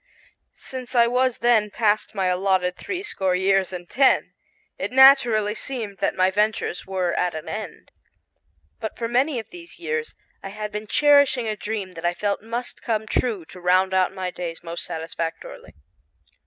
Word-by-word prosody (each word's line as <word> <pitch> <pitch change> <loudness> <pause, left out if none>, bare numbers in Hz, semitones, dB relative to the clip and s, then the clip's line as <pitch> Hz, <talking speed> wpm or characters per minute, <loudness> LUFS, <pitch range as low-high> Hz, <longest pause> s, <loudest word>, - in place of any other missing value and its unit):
Since 255 -1 -7
I 235 -1 +6
was 250 +1 +1
then 220 -3 +4
past 215 0 0
my 190 -1 0
allotted 180 0 +1
three 375 0 -5
score 190 - -1
years 190 0 +2
and 175 -1 -7
ten, 270 +7 +3 0.5
it - - -3
naturally 250 -6 +6
seemed 220 -4 -5
that - - 0
my 185 0 +3
ventures 210 -3 -1
were 185 -2 -1
at 180 -2 0
an 155 - -7
end. - - -7 0.9
But 220 - -5
for 230 - -2
many 255 +4 +1
of 225 - -6
these 350 -1 -12
years 465 0 -3 0.3
I 195 - -7
had 210 +1 -6
been 210 +1 -5
cherishing 285 -3 +4
a 215 - -1
dream 210 -2 -4
that 165 -2 -10
I 175 0 +1
felt 205 +1 -1
must 235 +3 -5
come 220 -2 -1
true 220 -5 -1
to 180 - -13
round 185 +1 +3
out 185 -1 +3
my 185 -1 -4
days 170 -1 -6
most 170 0 -6
satisfactorily. 165 0 -6
210 Hz, 170 wpm, -23 LUFS, 185-240 Hz, 0.9 s, I